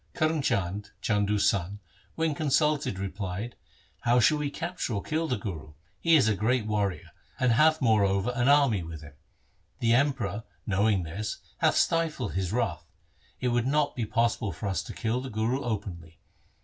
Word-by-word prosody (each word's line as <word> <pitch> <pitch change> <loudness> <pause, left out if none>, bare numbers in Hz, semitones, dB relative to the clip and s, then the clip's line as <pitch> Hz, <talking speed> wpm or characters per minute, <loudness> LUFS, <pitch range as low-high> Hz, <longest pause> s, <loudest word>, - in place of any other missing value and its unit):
Karm 155 -1 +1
Chand, 100 -2 -1
Chandu's 105 -1 +1
son, 100 +1 0 0.4
when 160 -1 0
consulted 150 - +1
replied, 100 +3 -4 0.2
' - - -34
How 120 +1 +5
shall 150 +6 +4
we 145 -1 -1
capture 170 -5 -3
or 100 - -3
kill 160 +1 -1
the 125 - 0
Guru? 80 -7 -6 0.3
He 165 -1 +4
is 135 -7 +5
a 110 - +3
great 110 +3 +1
warrior, 105 -3 -2 0.3
and 125 -1 +3
hath 155 +4 +4
moreover 100 -1 +3
an 120 0 +1
army 140 -9 +4
with 80 -2 -8
him. 75 0 -12 0.6
The 115 -1 +2
Emperor 120 -5 +1 0.2
knowing 100 -1 +2
this 100 +7 -4 0.2
hath - - +3
stifled 160 -9 +1
his 95 -1 -1
wrath. 90 -8 -1 0.5
It 125 - 0
would 120 0 +1
not 145 +1 +1
be 115 -3 -2
possible 115 -2 0
for 80 +5 -7
us 95 - -1
to - - -7
kill 120 +2 -1
the 130 - -6
Guru 115 +5 -1
openly. 95 -8 -5
110 Hz, 175 wpm, -28 LUFS, 100-135 Hz, 0.6 s, How